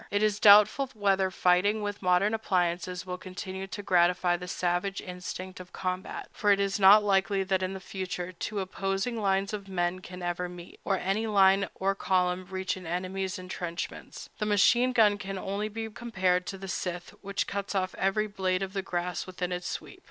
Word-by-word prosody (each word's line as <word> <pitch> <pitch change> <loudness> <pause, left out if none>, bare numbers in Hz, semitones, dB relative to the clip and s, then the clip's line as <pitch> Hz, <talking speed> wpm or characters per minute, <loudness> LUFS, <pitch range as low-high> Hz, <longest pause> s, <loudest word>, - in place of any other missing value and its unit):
It 205 +1 +1
is 210 -1 +1
doubtful 210 +6 +7
whether 195 -2 +2
fighting 185 +4 +2
with 205 0 -4
modern 180 +3 +3
appliances 180 -4 -1
will 180 0 -5
continue 190 +1 -6
to 195 +2 -7
gratify 175 -1 +3
the 180 +1 -7
savage 180 +3 -1
instinct 185 0 -7
of 180 0 -11
combat; 185 0 -4
for 205 - +2
it 200 - +4
is 200 +1 0
not 200 +2 +8
likely 195 -1 +2
that 190 -1 0
in 185 +1 -2
the - - -5
future 185 -2 -5
two 200 +3 -4
opposing 195 +4 -2
lines 195 0 +1
of 200 -2 -5
men 175 -1 -1
can 180 0 -9
ever 175 0 -2
meet, 175 0 -11
or 195 - +1
any 195 +5 -1
line 195 -1 +4
or 195 +1 +1
column 185 -1 0
reach 190 0 -2
an 185 -2 -9
enemy's 185 +2 -3
intrenchments. 180 -2 -6
The 210 - -1
machine 240 +5 +4
gun 210 -4 +4
can 195 -1 -5
only 200 +3 -3
be 225 +1 -4
compared 185 -6 -1
to 195 - -4
the 195 0 -8
scythe, 180 -1 -4
which 200 0 -2
cuts 200 0 -4
off 185 -1 0
every 195 +3 +1
blade 190 -2 -1
of 190 0 -5
grass 175 -1 -3
within 180 -1 -4
its 180 0 -3
sweep. - - -6
190 Hz, 190 wpm, -28 LUFS, 180-200 Hz, -, not